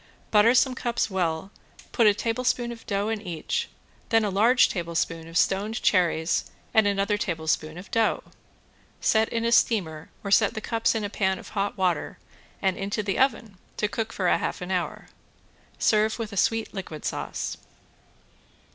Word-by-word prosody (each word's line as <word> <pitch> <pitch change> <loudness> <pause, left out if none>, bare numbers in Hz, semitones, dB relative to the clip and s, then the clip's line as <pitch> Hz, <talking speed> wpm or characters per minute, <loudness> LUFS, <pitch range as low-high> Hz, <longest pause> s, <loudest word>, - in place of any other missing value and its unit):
Butter 220 +3 +5
some 260 0 +4
cups 240 -4 -1
well, 175 0 -1 0.4
put 230 - +4
a 205 - +5
tablespoon 240 +2 -1
of 230 -1 -11
dough 200 +1 0
in 220 -2 -2
each, 170 -6 -3 0.4
then 225 -1 +3
a 205 - -1
large 230 +6 +5
tablespoon 165 -2 -2
of 165 +1 -3
stoned 200 +6 +1
cherries 170 -3 +2 0.2
and 220 -3 +5
another 200 +1 +1
tablespoon 160 -3 -1
of 180 - -11
dough. 225 -1 +1 0.8
Set 220 0 +2
in 230 0 -1
a 235 - +1
steamer 165 -10 +2
or 200 - -4
set 215 +2 +4
the - - -2
cups 225 +1 0
in 220 - -1
a 205 - -2
pan 190 -2 0
of - - -11
hot 205 0 -2
water 185 -2 0 0.5
and 190 -1 +1
into 200 +2 -2
the 200 -1 -1
oven 230 -7 0 0.2
to 210 - +1
cook 225 +1 -3
half 185 -3 0
an 180 +1 -6
hour. 180 -2 -2 0.7
Serve 215 0 +2
with 225 -3 -5
a - - -6
sweet 225 +4 +1
liquid 180 -6 -7
sauce. - - -3
205 Hz, 165 wpm, -26 LUFS, 180-225 Hz, 0.8 s, Butter